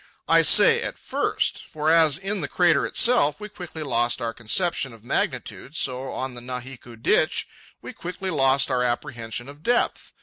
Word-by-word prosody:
I - - +6
say 465 0 +5
"at - - -4
first"; - - -2
for, 155 -1 0
as 160 -3 +5
in 195 +1 -3
the 145 - -2
crater 170 -5 +2
itself 230 - +2
we 210 - -8
quickly 175 -5 -8
lost 120 -4 0
our 115 -2 -3
conception 135 - -1
of 110 -2 -16
magnitude, 130 +3 -3
so, 130 -3 -2
on 130 0 -4
the 120 - -8
Nahiku 125 -1 -7
Ditch, - - +1 0.4
we - - -8
quickly 185 +2 -5
lost 135 -2 +2
our 125 -1 +1
apprehension 120 -1 -3
of 145 +1 -12
depth. 240 +6 0
140 Hz, 170 wpm, -24 LUFS, 125-175 Hz, 0.4 s, I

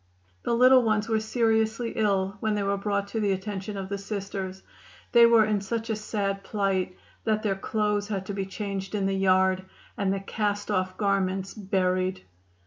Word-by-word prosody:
The 235 - 0
little 255 +2 +7
ones 215 -2 +1
were 220 -1 +2
seriously 225 +1 +1
ill 200 -2 +1
when 215 0 0
they 205 - 0
were 200 0 +1
brought 200 0 -1
to 225 - -2
the 205 -2 +2
attention 200 +1 -4
of 195 -1 -4
the 200 0 -3
Sisters. 195 -2 -5 0.5
They 235 -1 +8
were 230 -2 +6
in 210 -2 0
such 225 +3 -3
a - - +1
sad 200 -2 -2
plight 195 -3 -1 0.3
that 215 -1 0
their 200 -3 +1
clothes 210 +1 -1
had 195 -3 -3
to 200 - -4
be 195 -1 -3
changed 195 0 -4
in 200 -2 0
the 195 - +1
yard, 190 -1 +3 0.3
and 195 -1 0
the 195 - 0
cast 205 +1 -2
off 185 -1 -1
garments 195 -2 0
buried. 185 -2 0
200 Hz, 185 wpm, -27 LUFS, 195-215 Hz, 0.5 s, They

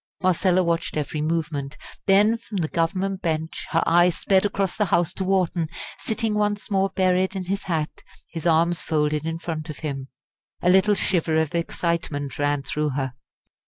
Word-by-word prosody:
Marcella 185 0 +3
watched 170 -2 -1
every 150 0 -2
movement; 155 -3 -2 0.3
then 205 +3 +5
from 230 -3 -7
the 165 -4 0
Government 185 +4 -1
bench 160 -1 -2
her 165 - +2
eye 175 +2 +5
sped 190 +2 +2
across 195 -2 -1
the 210 - +1
House 170 -2 +1
to 190 - -3
Wharton 180 -4 +1 0.3
sitting 220 -1 -1
once 210 0 -1
more 195 0 +2
buried 185 0 +1
in 185 -1 -3
his 195 +2 -2
hat, 160 -4 -2 0.3
his 165 0 -3
arms 170 +1 +3
folded 150 0 0
in 165 0 -2
front 160 -2 -5
of 155 - -7
him. 135 -2 -4 0.6
A 180 - +5
little 190 +3 +5
shiver 170 -5 +1
of 160 0 +1
excitement 165 -5 -2
ran 145 -1 +1
through 150 +2 -1
her. 135 -3 -2
170 Hz, 170 wpm, -24 LUFS, 155-190 Hz, 0.6 s, then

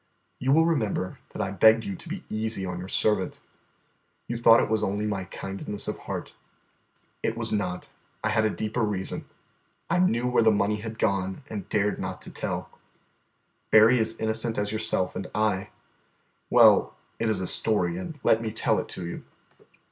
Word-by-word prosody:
You 130 +1 +1
will 160 +3 +5
remember 110 - -1
that - - -3
I 95 - -3
begged 110 +4 +5
you 100 - -3
to 170 - -12
be 185 +2 -5
easy 110 -2 -2
on 90 -1 -4
your 90 - -6
servant. 105 +2 0 0.9
You 120 - -3
thought 115 0 +6
it - - +1
was 110 -1 0
only 105 +1 -1
my 100 -3 -2
kindness 100 +2 -6
of - - -3
heart. - - -6 0.9
It 115 - -1
was 115 -1 -2
not; 100 -4 -2 0.3
I 110 - +1
had 110 0 +2
a 110 - +3
deeper 110 +3 -2
reason. 105 -4 -2 0.7
I 175 - +3
knew 125 -10 +2
where 125 -1 +3
the 110 - +5
money 105 0 +2
had 110 +1 -7
gone 95 +3 -1
and 100 -4 -5
dared 105 -1 +1
not - - -4
tell. - - -4 1.0
Berry 110 +3 +7
is 110 0 -1
as - - -22
innocent 110 +1 -1
as 105 0 -1
yourself 95 -4 -1
and 95 - -5
I 105 -2 0 0.8
well, - - +6 0.2
it 115 - +1
is 105 -4 0
a 95 - -2
story, 110 - 0
and 175 -5 -6
let 110 - +4
me 110 -1 -3
tell 110 - +1
it - - -5
to 90 - -5
you. 85 - -6
110 Hz, 185 wpm, -26 LUFS, 100-115 Hz, 1.0 s, Berry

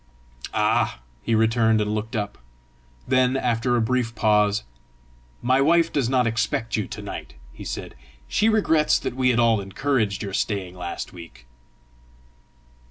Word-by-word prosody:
"Ah!" - - +1 0.2
he 115 - 0
returned, 110 0 +3
and 105 0 0
looked 110 +3 -4
up. 105 -1 -3 0.7
Then, 130 0 +3
after 120 -1 0
a 120 - +2
brief 115 0 0
pause, 105 -1 +2 0.8
"My 130 +2 +3
wife 165 +3 +3
does 135 -5 +1
not 130 -2 +2
expect 115 0 -1
you 110 - -2
to - - -8
night," 65 - -7 0.2
he - - -10
said. - - -6 0.3
"She 220 - +2
regrets 160 -8 +3
that - - -4
we 130 -1 +3
at 120 - +1
all 115 -3 +3
encouraged 105 +1 -1
your 100 -2 -5
staying 95 -3 -2
last 90 -1 -6
week." 85 -9 -12
115 Hz, 150 wpm, -24 LUFS, 105-130 Hz, 0.8 s, returned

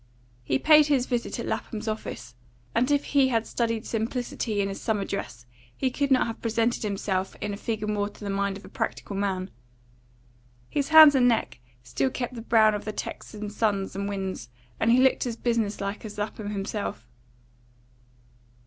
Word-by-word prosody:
He 130 +2 +1
paid 305 - +6
his 275 -4 +2
visit 245 -2 -2
at - - -3
Lapham's 220 0 -4
office, 130 - -5 0.4
and 245 +4 +2
if 285 -1 +2
he 275 -2 +3
had 230 -3 +1
studied 230 -1 -1
simplicity 225 -1 -2
in 200 - +1
his 195 - -6
summer 210 -3 0
dress 125 -11 -5 0.3
he 260 - 0
could 280 +2 -1
not 260 -2 +4
have 230 - -6
presented 230 +1 0
himself 195 -2 -2
in 210 -1 -3
a - - -3
figure 220 0 -3
more 205 -1 -1
to 210 - -14
the 200 - -2
mind 200 0 -1
of 205 - -13
a - - -10
practical 200 - -4
man. 195 -1 -2 1.2
His 285 0 -1
hands 315 -2 +10
and 255 -2 +4
neck 230 - 0 0.2
still 130 +2 0
kept 245 - -4
the 235 - -7
brown 220 -2 +4
of 210 - -3
the 215 - -3
Texan 210 0 -6
suns 205 -3 -1
and 200 +1 -2
winds, 190 - -4 0.3
and 225 - +2
he 240 - +6
looked 260 0 +3
as 235 - -3
business 230 -4 -1
like 200 +1 -4
as 210 -1 -8
Lapham 210 0 -4
himself. 200 - -4
215 Hz, 185 wpm, -26 LUFS, 200-240 Hz, 1.2 s, hands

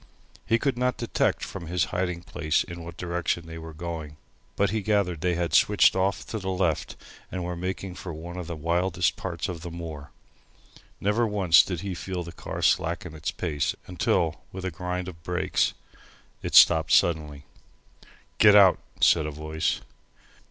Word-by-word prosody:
He 115 - +4
could 130 0 -1
not 125 0 +1
detect 120 - 0
from 85 -4 -7
his 90 +1 +1
hiding 90 -1 -2
place 80 -3 0
in 85 -1 -8
what 85 0 -9
direction 85 -1 -2
they 80 0 -8
were 80 0 -8
going, 80 -2 -6 0.4
but 100 -1 +1
he 110 0 -1
gathered 100 -6 0
they 90 -1 +1
had 85 -3 -2
switched - - +5
off 95 +1 0
to 110 - -4
the 95 -1 -4
left 90 -4 -1 0.4
and 90 -1 -3
were 90 0 -3
making 95 +1 -4
for 90 0 -7
one 85 +3 -8
of 90 -2 -6
the 85 - -4
wildest 85 +3 0
parts 85 -3 -4
of 85 -3 -6
the 85 - -6
moor. 80 -3 -7 0.9
Never 110 +4 +1
once 95 -5 +5
did 90 -4 -4
he 100 -2 -4
feel 90 0 -4
the 85 - -8
car - - -6
slacken - - +1
its 80 -1 -4
pace, 75 -6 -2
until, 85 -3 0
with 95 0 -7
a 95 - -2
grind 90 +2 -4
of 85 -3 -9
brakes, 90 +2 0 0.7
it - - -3
stopped 80 -2 +7
suddenly. 75 -4 +2 0.9
"Get 105 -1 +8
out," 95 -3 +7 0.2
said 80 -3 +5
a - - -3
voice. 75 +1 -2
85 Hz, 175 wpm, -26 LUFS, 80-95 Hz, 0.9 s, Get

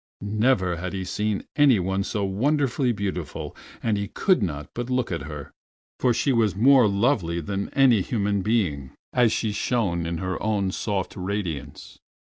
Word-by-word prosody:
Never 105 -4 +1
had 90 +3 -5
he 95 -1 -3
seen 105 +2 -2
any 145 -6 +5
one 95 +2 -1
so 105 0 -2
wonderfully 130 +5 +1
beautiful, 95 -7 -4 0.3
and 110 -3 +1
he 100 - -3
could 185 - +2
not 75 -6 -3
but 120 +1 -4
look 125 -4 0
at 85 -3 -2
her, 75 -2 -8 0.5
for 125 - +3
she 130 +4 +1
was 110 -5 +2
more 125 +2 +6
lovely 100 -5 +1
than 100 +5 -3
any 130 -7 +5
human 100 -1 -1
being 90 - -1 0.2
as 120 -3 +4
she 110 - 0
shone 100 -6 -1
in 85 0 -2
her 90 +2 -3
own 100 -3 0
soft 100 -2 -3
radiance. 90 -5 -5
100 Hz, 165 wpm, -24 LUFS, 90-120 Hz, 0.5 s, more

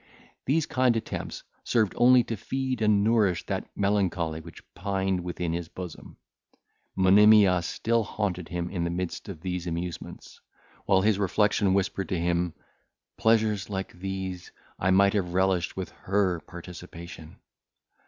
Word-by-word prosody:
These 155 +3 +2
kind 130 -6 +2
attempts 110 - -5 0.2
served 110 -5 +1
only 125 0 +6
to 115 - -4
feed 130 +3 -3
and 105 -2 +3
nourish 105 -5 +2
that - - -3
melancholy 95 -6 0
which 85 0 -13
pined 95 -1 -1
within 85 -1 -3
his 85 -1 -3
bosom. 90 -1 -9 0.8
Monimia 100 -1 +6
still 115 +6 0
haunted 95 -5 -3
him 85 0 -3
in 90 -3 -2
the 85 - -1
midst 90 +3 -4
of 85 -5 -8
these 90 -1 -3
amusements, 85 +1 -6 0.5
while 95 -1 +4
his 105 0 +2
reflection 100 0 +2
whispered 95 0 -1
to 90 -3 -1
him, 85 0 0 0.6
"Pleasures 110 -3 +2
like 95 -1 -4
these 95 -1 -5 0.3
I 90 - +1
might 100 +1 +5
have 90 -4 -1
relished 95 -2 +1
with 95 - -4
her 95 -3 0
participation." 85 -2 -10
95 Hz, 140 wpm, -27 LUFS, 90-105 Hz, 0.8 s, only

